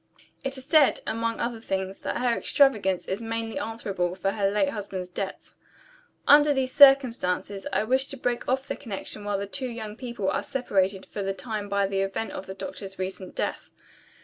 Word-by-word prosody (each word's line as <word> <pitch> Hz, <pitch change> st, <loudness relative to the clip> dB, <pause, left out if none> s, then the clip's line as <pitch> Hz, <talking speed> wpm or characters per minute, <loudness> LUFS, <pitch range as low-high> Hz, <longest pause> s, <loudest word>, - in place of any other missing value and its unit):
It 270 Hz, 0 st, -2 dB
is 265 Hz, -, -7 dB
said, 300 Hz, -1 st, +5 dB
among 230 Hz, 0 st, -1 dB
other 235 Hz, -1 st, -2 dB
things, 190 Hz, -2 st, -3 dB
that -, -, -3 dB
her 245 Hz, -2 st, +2 dB
extravagance 210 Hz, -, +2 dB
is 190 Hz, +4 st, -2 dB
mainly 225 Hz, +3 st, -3 dB
answerable 195 Hz, -7 st, -2 dB
for 195 Hz, +1 st, 0 dB
her 200 Hz, -1 st, +1 dB
late 210 Hz, +8 st, +2 dB
husband's 195 Hz, -6 st, -5 dB
debts. 190 Hz, +2 st, -5 dB, 0.7 s
Under 295 Hz, 0 st, +7 dB
these 260 Hz, -1 st, 0 dB
circumstances, 240 Hz, -7 st, +5 dB
I -, -, +1 dB
wish 260 Hz, +4 st, +2 dB
to 275 Hz, -, -7 dB
break 245 Hz, -1 st, -2 dB
off 265 Hz, +1 st, 0 dB
the -, -, -2 dB
connection 210 Hz, -3 st, -6 dB
while 205 Hz, -1 st, -1 dB
the 200 Hz, -, -3 dB
two 255 Hz, +6 st, -4 dB
young 220 Hz, -3 st, -6 dB
people 235 Hz, -5 st, -4 dB
are -, -, 0 dB
separated 195 Hz, -7 st, 0 dB
for 205 Hz, -, -6 dB
the 195 Hz, 0 st, -2 dB
time 210 Hz, -1 st, -4 dB
by 200 Hz, 0 st, +2 dB
the 195 Hz, 0 st, 0 dB
event 195 Hz, +3 st, -2 dB
of 190 Hz, -, -7 dB
the 190 Hz, -, -6 dB
doctor's 195 Hz, -5 st, -7 dB
recent 185 Hz, 0 st, -5 dB
death. -, -, -3 dB
215 Hz, 190 wpm, -26 LUFS, 195-255 Hz, 0.7 s, Under